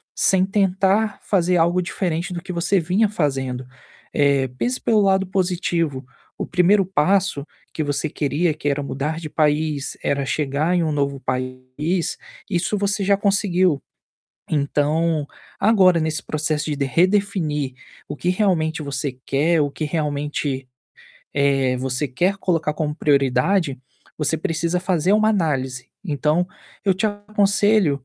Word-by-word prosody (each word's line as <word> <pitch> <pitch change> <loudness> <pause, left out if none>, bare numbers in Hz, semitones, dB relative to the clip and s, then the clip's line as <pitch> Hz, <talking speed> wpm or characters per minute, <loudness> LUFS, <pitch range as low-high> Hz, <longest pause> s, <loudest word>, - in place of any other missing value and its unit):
sem 190 -1 +4
tentar 195 +1 +1
fazer 180 -2 +1
algo 170 +2 +2
diferente 175 -1 -2
do 175 - -4
que 180 +1 -7
você 175 +3 +1
vinha 185 +6 +2
fazendo. 135 -8 -2 0.5
Eh, 140 -2 +3
pense 250 - -1
pelo 220 -2 +3
lado 190 -1 +2
positivo, 175 -6 -1 0.3
o - - -3
1º 195 +3 +4
passo 185 -3 +1 0.3
que 155 - -2
você 145 +1 -1
queria, 150 +4 0
que 145 - -5
era 145 +1 0
mudar 145 +4 -3
de 155 -2 -7
país, 150 -2 0
era 140 -1 0
chegar 150 +4 0
em 175 - +2
um 160 - 0
novo 140 -2 -1
país, 130 +6 -2 0.3
isso 185 +2 0
você 200 0 0
já 200 +1 +4
conseguiu. 185 -6 +2 0.7
Então, 150 +1 +1 0.3
agora, 190 -6 +5
nesse 160 0 -1
processo 155 0 -1
de 140 - 0
redefinir 165 -3 +1 0.3
o 145 - -4
que 175 - -3
realmente 170 -5 +1
você 140 -1 -2
quer, 155 +4 +2
o 145 -1 +1
que 155 - -4
realmente, 145 -3 -2 0.6
eh, 135 -2 +2
você 130 +3 -1
quer 180 +10 0
colocar 165 -5 0
como 150 -2 -2
prioridade, 140 +2 +2 0.4
você 155 +1 +2
precisa 165 +1 -1
fazer 180 0 +1
uma 215 +1 +4
análise. 135 - -1 0.2
Então, 155 +1 +1 0.4
eu 195 - +4
te 195 +4 0
aconselho 205 - +1
160 Hz, 140 wpm, -21 LUFS, 145-190 Hz, 0.7 s, agora